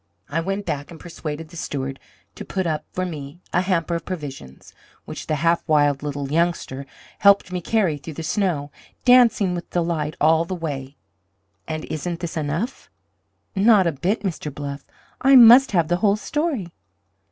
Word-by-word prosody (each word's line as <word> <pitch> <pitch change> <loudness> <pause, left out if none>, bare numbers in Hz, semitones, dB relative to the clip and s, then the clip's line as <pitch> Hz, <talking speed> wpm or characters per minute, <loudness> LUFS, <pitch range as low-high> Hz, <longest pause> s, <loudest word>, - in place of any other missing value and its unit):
I 165 +3 -1
went 195 +3 -3
back 145 -4 -3
and 165 -2 -11
persuaded 160 -2 -7
the 170 - -11
steward 135 -3 -4 0.3
to - - -8
put 190 -1 -3
up 155 -2 -2
for 185 - -2
me 150 -2 -7
a 180 - +3
hamper 175 -3 0
of 170 - -2
provisions, 140 - -8 0.3
which - - -8
the 155 - 0
half 165 +3 +2
wild 145 -3 +3
little 145 -1 -4
youngster 155 -5 -1 0.3
helped 200 -2 +5
me 180 -1 -3
carry 185 -7 +1
through 155 +2 -9
the 165 - -5
snow, 160 -6 -1 0.3
dancing 240 -7 +5
with 175 0 -6
delight 165 -3 -1
all 160 +1 +4
the 185 +2 -4
way. 140 -5 -5 0.7
And 155 -1 -4
isn't 170 +2 -4
this 170 -2 -5
enough?" 160 - -3 0.7
"Not 200 -1 +5
a 170 - +2
bit, 175 +9 -1
Mr. 165 -6 -3
Bluff. 140 0 -7 0.3
I 270 +1 +6
must 245 +2 +9
have 170 -4 +3
the 175 +1 +1
whole 200 +1 +3
story." 275 - -2
165 Hz, 170 wpm, -22 LUFS, 150-190 Hz, 0.7 s, must